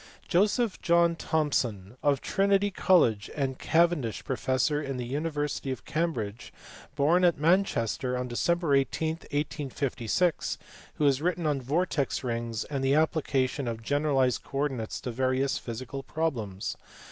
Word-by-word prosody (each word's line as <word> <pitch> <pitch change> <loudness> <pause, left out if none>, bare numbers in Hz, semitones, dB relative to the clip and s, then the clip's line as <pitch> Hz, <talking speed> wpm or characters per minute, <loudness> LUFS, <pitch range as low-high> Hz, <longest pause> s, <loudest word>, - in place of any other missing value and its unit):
Joseph 210 +4 +2
John 170 -1 +4
Thomson, 125 - -1
of 140 -2 +2
Trinity 200 +1 +2
College, 120 - +3
and 135 -3 -2
Cavendish 165 -8 +1
professor 130 +2 0
in 135 -3 -4
the 125 - -3
university 145 +1 -2
of 130 - -5
Cambridge, 120 -10 -2 0.4
born 160 +5 +3
at 175 -3 +4
Manchester 140 - +1
on 125 0 -2
Dec. 160 +5 +1
18, 155 +4 -2
1856, 145 -1 -1 0.4
who 150 - 0
has 140 -1 +3
written 175 0 0
on 145 -3 +1
vortex 145 +1 0
rings 115 -2 -2
and 140 -2 -4
the 135 +1 +3
application 140 -4 +1
of 115 -1 -4
generalized 140 -2 +1
coordinates 130 -4 -2
to 125 - -4
various 130 +2 0
physical 130 +4 -6
problems. 115 -11 -3
140 Hz, 130 wpm, -28 LUFS, 125-160 Hz, 0.4 s, John